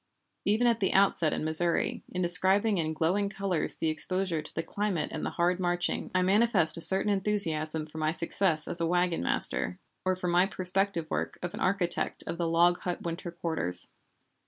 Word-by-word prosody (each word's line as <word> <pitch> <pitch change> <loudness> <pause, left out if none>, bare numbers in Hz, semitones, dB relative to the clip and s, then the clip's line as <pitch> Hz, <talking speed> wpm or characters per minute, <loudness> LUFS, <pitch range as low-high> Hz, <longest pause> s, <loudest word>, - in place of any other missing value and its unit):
Even 215 +4 +1
at 235 -1 +2
the 195 - 0
outset 190 -5 +3
in - - -3
Missouri, 165 +2 0
in 180 0 -3
describing 190 +4 +1
in 155 -1 -2
glowing 180 +6 -1
colors 195 -4 -2
the 160 - -2
exposure 180 +1 +1
to 150 - -14
the 165 - -2
climate 200 -6 -3
and - - -6
the - - -2
hard 175 +1 +1
marching, 175 -1 -2
I 185 - +2
manifest 200 -3 +4
a 165 - -3
certain 195 +4 +4
enthusiasm 160 -6 0
for 155 +1 -10
my 155 0 0
success 165 -1 0
as 170 - -1
a 165 - 0
wagon 175 0 0
master, 90 +1 0 0.3
or 185 0 0
for 185 0 -5
my 175 +2 +2
prospective 185 -2 -2
work 80 +2 -3
of 175 - -5
an - - -7
architect 185 -2 -1
of 170 - -6
the 170 - -1
log 170 +2 +2
hut 180 -1 -5
winter 170 +1 -5
quarters. 160 - +4
175 Hz, 190 wpm, -28 LUFS, 165-195 Hz, 0.3 s, manifest